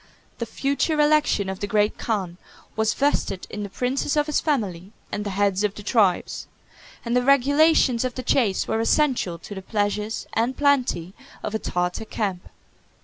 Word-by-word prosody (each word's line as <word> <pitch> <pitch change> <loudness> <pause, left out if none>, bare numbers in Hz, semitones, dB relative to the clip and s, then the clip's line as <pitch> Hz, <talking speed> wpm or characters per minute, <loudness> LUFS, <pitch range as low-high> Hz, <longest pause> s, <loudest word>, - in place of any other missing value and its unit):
The 235 - -3
future 280 +5 0
election 295 -9 +3
of 190 0 -4
the 205 - -3
great 210 0 +1
khan 190 -6 -2 0.4
was 220 0 +1
vested 270 -9 0
in 210 - -5
the 200 - -4
princes 255 +8 -1
of 295 - +3
his 300 -1 0
family 205 - -2 0.2
and 205 - -2
the 205 - -3
heads 200 0 +1
of 205 -1 0
the 210 - -9
tribes; 205 -4 +1 0.6
and 235 +1 0
the 250 - +4
regulations 275 -1 +4
of 255 -1 -3
the 255 - -5
chase 230 -6 +1
were 220 - 0
essential 230 - +1
to 190 - -10
the 190 - -6
pleasures 210 +1 -2
and 240 +3 0
plenty 255 - +1 0.3
of 210 - -3
a 220 - 0
Tartar 180 +3 -2
camp. 195 -5 -3
220 Hz, 175 wpm, -24 LUFS, 200-270 Hz, 0.6 s, the